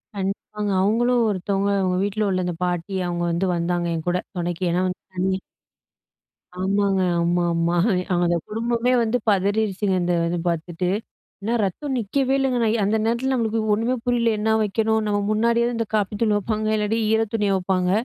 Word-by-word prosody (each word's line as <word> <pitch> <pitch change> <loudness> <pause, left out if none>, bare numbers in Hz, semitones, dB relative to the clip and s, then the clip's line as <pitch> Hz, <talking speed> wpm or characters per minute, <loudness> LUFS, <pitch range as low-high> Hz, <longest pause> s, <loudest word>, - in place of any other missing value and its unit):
கண்டிப்பாங்க. 200 +1 -3
அவுங்களும் 235 +4 +2
ஒருத்தவங்க 195 +1 -1
அவுங்க 180 -1 +1
வீட்ல 205 +1 0
உள்ள 185 -1 0
அந்த 175 -2 -2
பாட்டி, 180 +2 -2
அவுங்க 175 0 -2
வந்து 170 +3 0
வந்தாங்க 175 0 -1
என்கூட, 175 +3 -1 0.2
தொணைக்கு. 175 +1 -3
ஏன்னா 180 +2 +1 0.3
வந்தி 190 +1 0 1.2
ஆமாங்க. 195 0 +1 0.2
ஆமா, 175 +1 +1
ஆமா. 170 +1 +1 0.5
அந்த 175 0 +2
குடும்பமே 235 +3 0
வந்து 230 +2 +1
பதரிருச்சுங்க, 200 0 +1
இந்த 175 0 +1
இது 175 +1 -1
பாத்துட்டு. 170 +2 -2 0.5
என்னா 225 +4 -1
ரத்தம் 265 +9 -2
நிக்கவே 265 +5 0
இல்லங்க. 265 -2 +1
நான் 220 0 +2
அந்த 210 +3 +2
நேரத்தில 235 +4 0
நம்மளுக்கு 225 -3 0
ஒண்ணுமே 230 +4 +1
புரியல. 240 -1 +2
என்னா 220 +1 +1
வைக்கணும்? 220 +1 +1
நம்ம 205 0 +1
முன்னாடியாவது 235 +2 +2
இந்த 230 -2 -1
காப்பி 210 0 0
தூள் 215 -2 +3
வைப்பாங்க, 215 +1 -2
இல்லாட்டி 215 +1 0
ஈர 220 - +3
துணிய 210 -3 +1
வப்பாங்க. 185 -1 0
205 Hz, 155 wpm, -23 LUFS, 180-225 Hz, 1.2 s, தூள்